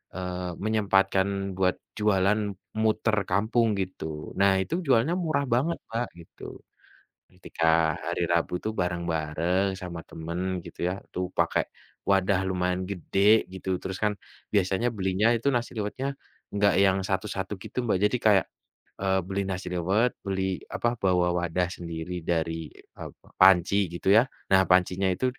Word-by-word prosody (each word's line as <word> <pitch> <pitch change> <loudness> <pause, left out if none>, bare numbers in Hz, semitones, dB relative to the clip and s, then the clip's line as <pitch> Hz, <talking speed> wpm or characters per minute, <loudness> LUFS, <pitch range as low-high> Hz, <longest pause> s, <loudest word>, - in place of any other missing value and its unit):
eee, 90 -1 -4
menyempatkan 100 -3 +2 0.3
buat 95 -1 +2 0.2
jualan 105 0 +3 0.4
muter 110 0 +2
kampung 110 +5 +2
gitu. 95 -4 -5 0.3
Nah, 100 0 +5
itu 95 - -4
jualnya 130 +5 +3
murah 155 -4 +1
banget 155 +8 +1
Mbak, 115 +2 -2
gitu, 85 - -15 0.9
ketika 90 -2 -4 0.4
hari - - -2
Rabu 85 +1 +1
tuh 110 - -2
bareng-bareng 85 +1 0
sama 85 -2 -6
temen 85 +2 -5 0.3
gitu - - -12
ya, - - -1 0.2
tuh 90 - -1
pakai - - +2 0.5
wadah 95 -1 +3
lumayan 90 0 0
gede 100 +3 +3
gitu, 95 0 -6
terus 95 0 -4
kan 105 -1 +2 0.4
biasanya 95 +3 +2
belinya 95 +2 +1
itu 115 +5 -4
nasi 120 0 -1
liwetnya 105 +6 -3 0.5
enggak 100 0 +3
yang 95 0 +4
satu-satu 95 +1 -2
gitu, - - -11
Mbak. 105 -5 +2
Jadi 115 +4 +2
kayak, 100 -3 +5 0.6
eee, 95 -1 +2
beli 100 +1 -1
nasi 95 -1 -4
liwet, 95 +8 +2
beli 95 -1 -1 0.3
apa, 120 - +1
bawa 90 -2 +3
wadah 85 +1 0
sendiri 85 0 -6 0.2
dari, 80 -1 0 0.4
eee, - - -7 0.3
panci 95 0 +6 0.2
gitu 85 - -6
ya. 115 - +7 0.3
Nah, 95 0 +7
pancinya 90 +1 +3
itu, 130 - -2
95 Hz, 140 wpm, -27 LUFS, 90-105 Hz, 0.9 s, ya